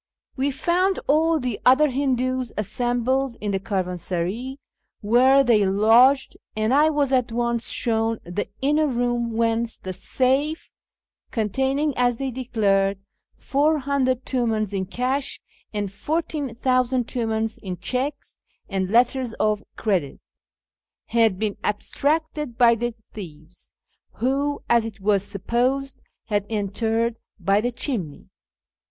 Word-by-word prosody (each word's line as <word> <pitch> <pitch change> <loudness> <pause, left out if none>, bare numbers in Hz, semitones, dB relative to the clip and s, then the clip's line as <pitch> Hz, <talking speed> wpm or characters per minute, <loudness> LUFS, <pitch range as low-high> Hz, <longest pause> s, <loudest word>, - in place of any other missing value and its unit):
We 275 +1 0
found 355 +7 +1
all 315 +3 +3
the 250 -5 -3
other 270 +3 +5
Hindoos 255 -2 0
assembled 245 +4 0
in 210 -1 -2
the 195 - 0
caravansaray 190 +5 -3 0.4
where 255 +6 +5
they 230 -5 +4
lodged, 225 +8 +4 0.2
and 215 +3 +1
I 300 +3 +5
was 290 -3 +1
at 250 -3 +2
once 235 0 -1
shown 225 -1 0
the 175 +4 -3 0.2
inner 300 +2 +3
room 240 -2 0
whence 230 0 0
the 185 - -6
safe 270 - 0 0.6
(containing, 265 +7 0
as 245 -1 +2
they 270 0 -3
declared, 200 -6 +1 0.4
400 280 -3 +1
tumcins 220 -5 0
in 190 -1 -2
cash, 255 +6 -2 0.3
and 205 -2 -3
14,000 255 -3 0
Piimdns 225 -2 -2
in 185 -2 -5
cheques 260 +10 -4 0.3
and 190 -2 -2
letters 245 +2 +2
of 215 -1 +1
credit) 180 -11 -1 0.9
had 225 -4 +3
been 210 0 -2
abstracted 295 +4 -1
by 235 -1 +6
the 235 0 -2 0.2
thieves, 165 -4 -11 0.4
who, 280 +4 -1
as 235 -1 +4
it 220 -2 -7
was 200 0 +2
supposed, 245 +8 -1 0.2
had 205 -2 -1
entered 225 +2 -1 0.2
by 195 +3 +2
the 245 +2 -1
chimney. 220 - -4
235 Hz, 120 wpm, -23 LUFS, 210-265 Hz, 0.9 s, by